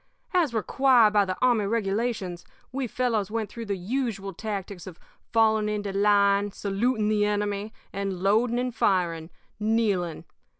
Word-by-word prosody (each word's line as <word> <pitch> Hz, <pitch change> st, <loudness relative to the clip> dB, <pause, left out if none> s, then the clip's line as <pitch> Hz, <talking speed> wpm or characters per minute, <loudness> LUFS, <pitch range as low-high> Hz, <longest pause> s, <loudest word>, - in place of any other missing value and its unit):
As 345 Hz, -7 st, +2 dB
required 235 Hz, -1 st, +3 dB
by 205 Hz, -1 st, +4 dB
the 185 Hz, -1 st, -3 dB
army 235 Hz, -5 st, +3 dB
regulations, 205 Hz, -4 st, -2 dB, 0.3 s
we 260 Hz, 0 st, -2 dB
fellows 225 Hz, -4 st, -1 dB
went 220 Hz, -1 st, -3 dB
through 230 Hz, -2 st, -7 dB
the 200 Hz, -1 st, -1 dB
usual 200 Hz, -1 st, -3 dB
tactics 200 Hz, -2 st, -6 dB
of 180 Hz, -3 st, -10 dB, 0.3 s
falling 220 Hz, -2 st, +3 dB
into 205 Hz, -2 st, -3 dB
line, 200 Hz, 0 st, +3 dB
saluting 210 Hz, +3 st, -1 dB
the 210 Hz, -1 st, +2 dB
enemy, 205 Hz, 0 st, -1 dB, 0.2 s
and 195 Hz, -2 st, -3 dB
loading 225 Hz, +4 st, +2 dB
and 250 Hz, 0 st, -1 dB
firing, 170 Hz, -6 st, 0 dB, 0.3 s
kneeling. 210 Hz, -6 st, 0 dB
210 Hz, 140 wpm, -26 LUFS, 195-230 Hz, 0.3 s, by